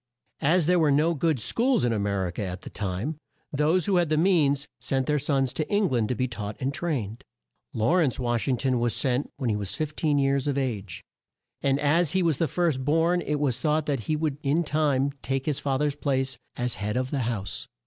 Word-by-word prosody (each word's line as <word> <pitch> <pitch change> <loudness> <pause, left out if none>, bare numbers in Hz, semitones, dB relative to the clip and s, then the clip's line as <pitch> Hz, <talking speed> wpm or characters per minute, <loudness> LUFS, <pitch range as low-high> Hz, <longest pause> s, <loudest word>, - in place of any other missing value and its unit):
As 165 +3 +3
there 180 +2 +3
were 155 -2 +3
no 150 +4 +3
good 160 -2 0
schools 240 - +2
in 120 - +1
A 110 - 0
mer 100 -1 0
i 90 - -3
ca 90 - -6
at 90 0 -5
that - - -9
time, 105 - -3 0.4
those 155 +5 +2
who 195 -3 +2
had 175 -3 +2
the 155 - +2
means 150 -5 +3
sent 135 -1 0
their 150 +1 +1
sons 135 -2 0
to 155 - -3
Eng 205 -1 +2
land 120 -5 0
to 125 - 0
be 130 +1 0
taught 105 -3 -6
and 135 +2 -1
trained. 130 -9 -3 0.5
Law 115 +11 +2
rence 150 -8 +2
Wash 120 -1 -1
ing 130 -2 +2
ton 130 -1 +1
was 120 -1 0
sent 130 0 0
when 130 -5 -1
he - - 0
was 100 -2 -3
15 155 -1 0
years 135 0 +1
of 140 -1 0
age, 105 -9 -3 0.6
and 140 0 +2
as 150 +2 +2
he 190 -1 +2
was 160 -5 +1
the 165 - +2
first 155 -4 0
born 165 +5 +2
it 150 -3 -2
was 130 -4 0
thought 155 0 +1
that 140 -7 -2
he 155 - +2
would 150 -2 -2
in 150 +4 +1
time 145 -3 +1
take 135 0 -2
his 150 -3 -1
fa 135 -2 0
ther's 145 0 0
place, 135 -3 0 0.2
as 125 0 0
head 105 +3 -1
of 130 0 -2
the 145 - -1
house. 115 -5 -3
140 Hz, 230 wpm, -26 LUFS, 125-155 Hz, 0.6 s, As